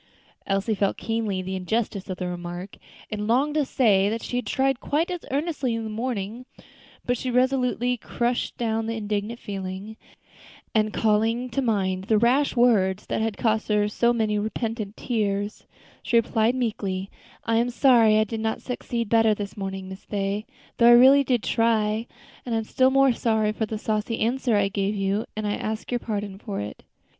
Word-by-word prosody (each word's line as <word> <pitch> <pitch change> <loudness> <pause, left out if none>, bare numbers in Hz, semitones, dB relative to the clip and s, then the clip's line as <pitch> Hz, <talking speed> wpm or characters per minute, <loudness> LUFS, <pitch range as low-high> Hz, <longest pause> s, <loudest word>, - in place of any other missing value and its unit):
Elsie 195 +3 0
felt 200 -1 0
keenly 220 -5 -2
the 190 +1 -4
injustice 200 +1 -2
of 185 - -3
the 180 - -3
remark, 175 +2 -6 0.3
and 210 -1 -3
longed 270 +6 +2
to 305 -1 +2
say 205 -7 +3
that 225 +1 -3
she 245 - -3
had 245 -4 -3
tried 270 +2 +1
quite 320 +5 0
as 355 -2 -4
earnestly 280 -4 -1
in 230 - -3
the 220 - -5
morning; 230 +1 -4 0.6
but 245 - +1
she 255 - -3
resolutely 250 -1 +1
crushed 240 +1 -2
down 225 -1 -1
the 230 - -2
indignant 210 +1 -3
feeling, 195 +2 -6 0.8
and 215 -1 +2
calling 225 +3 +1
to 275 - 0
mind 190 -6 0
the 215 +1 +3
rash 255 +7 +3
words 210 -6 +3
that - - -2
had 220 -2 -1
cost 220 -1 0
her 210 -1 +2
so 235 +3 +2
many 215 -3 0
repentant 220 -1 -3
tears, 205 -3 -2 0.3
she 235 - +2
replied 230 +1 +2
meekly, 200 -6 -2 0.3
"I 225 0 +1
am 235 +1 +2
sorry 235 -4 +5
I 215 - +4
did 220 +1 -5
not 220 0 -1
succeed 240 -2 -3
better 225 0 +4
this 200 -1 -6
morning, 195 -1 -5
Miss 190 +1 -10
Day, 200 +1 -2 0.3
though 235 - +5
I 240 - +9
did - - +8
really 275 +2 +7 0.2
try; 225 -1 +1 0.4
and 235 -2 -2
I - - +2
am 225 - -1
still 260 +4 +3
more 270 -1 +4
sorry 220 -2 +1
for 215 0 -2
the 220 - -4
saucy 215 +1 -2
answer 240 +1 +1
I 200 -1 +3
gave 200 +1 -1
you; 195 +2 0
and 215 - -2
I 205 - 0
ask 215 +2 -4
your 245 - 0
pardon 205 -4 -4
for 205 -1 -5
it." 105 0 -6
220 Hz, 190 wpm, -25 LUFS, 205-240 Hz, 0.8 s, I